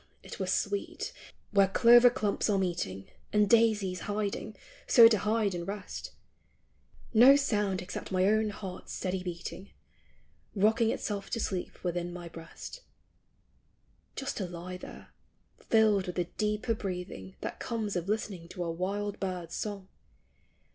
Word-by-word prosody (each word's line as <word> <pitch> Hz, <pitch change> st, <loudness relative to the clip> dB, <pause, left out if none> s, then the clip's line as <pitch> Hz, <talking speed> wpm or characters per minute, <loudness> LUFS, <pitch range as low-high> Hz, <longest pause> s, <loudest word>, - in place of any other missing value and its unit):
it -, -, -9 dB
were -, -, -2 dB
sweet, 405 Hz, +4 st, -2 dB, 0.4 s
where 200 Hz, -2 st, +5 dB
clover 240 Hz, +5 st, +7 dB
clumps 210 Hz, -3 st, -1 dB
are 205 Hz, -, +3 dB
meeting 170 Hz, -, -2 dB, 0.3 s
And 210 Hz, -1 st, +4 dB
daisies 210 Hz, -5 st, +3 dB
hiding, 210 Hz, +1 st, -3 dB, 0.3 s
so 230 Hz, -1 st, +9 dB
to 220 Hz, -3 st, +3 dB
hide 215 Hz, 0 st, +1 dB
and 170 Hz, -1 st, -4 dB
rest; 200 Hz, 0 st, -6 dB, 1.0 s
No 250 Hz, +5 st, +9 dB
sound 210 Hz, -10 st, 0 dB
except 180 Hz, -, -7 dB
my 185 Hz, 0 st, +2 dB
own 215 Hz, +1 st, +3 dB
heart's 195 Hz, -3 st, -7 dB
steady 185 Hz, 0 st, -2 dB
heating, 180 Hz, +2 st, -6 dB, 0.9 s
Rocking 220 Hz, +3 st, +3 dB
itself 205 Hz, -3 st, -3 dB
to 230 Hz, -, -2 dB
sleep 185 Hz, -4 st, -4 dB
within 175 Hz, -1 st, -2 dB
my 175 Hz, -1 st, -7 dB
breast; 165 Hz, -, -10 dB, 0.6 s
— -, -, -40 dB
Just, 270 Hz, -, -4 dB
to 190 Hz, -, -2 dB
lie 175 Hz, +1 st, -7 dB
there, -, -, -11 dB, 0.5 s
filled 215 Hz, -4 st, +3 dB
with 180 Hz, -, -4 dB
the 180 Hz, -, +1 dB
deeper 210 Hz, +5 st, -1 dB
breathing 180 Hz, -, -6 dB
That -, -, -5 dB
comes 220 Hz, -4 st, -3 dB
of 175 Hz, +2 st, -2 dB
listening 200 Hz, -5 st, -2 dB
to 180 Hz, 0 st, -5 dB
a 170 Hz, -, -2 dB
wild 200 Hz, +4 st, -3 dB
bird's 180 Hz, -3 st, -4 dB
song 200 Hz, -3 st, -4 dB
200 Hz, 145 wpm, -30 LUFS, 180-215 Hz, 1.0 s, so